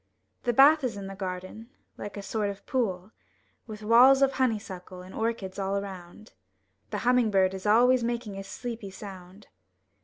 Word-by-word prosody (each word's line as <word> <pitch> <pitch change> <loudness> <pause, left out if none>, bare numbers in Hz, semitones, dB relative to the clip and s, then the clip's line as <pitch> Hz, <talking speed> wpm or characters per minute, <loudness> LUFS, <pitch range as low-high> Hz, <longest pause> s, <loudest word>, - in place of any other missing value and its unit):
The 240 - +3
bath 280 +5 +6
is 235 -5 -2
in 200 - -6
the 195 - -7
garden, 190 +4 -6 0.3
Uke 205 - -7
a 200 - -6
sort 205 +1 -2
of 200 0 -8
pool. 200 -6 -2 0.6
With 215 -1 -9
walls 255 +5 +6
of 270 - +4
honey 255 -5 +1
suckle 185 -2 -10
and 185 - -12
orchids 220 -4 -3
all 195 0 -1
around. 195 +1 -8 0.6
The - - -3
humming 250 -2 +4
bird 190 -2 +2
is 190 +2 -5
always 245 +3 +5
making 235 -3 -3
a 195 - -6
sleepy 225 +1 -7
sound. 190 0 -11
210 Hz, 175 wpm, -27 LUFS, 190-235 Hz, 0.6 s, bath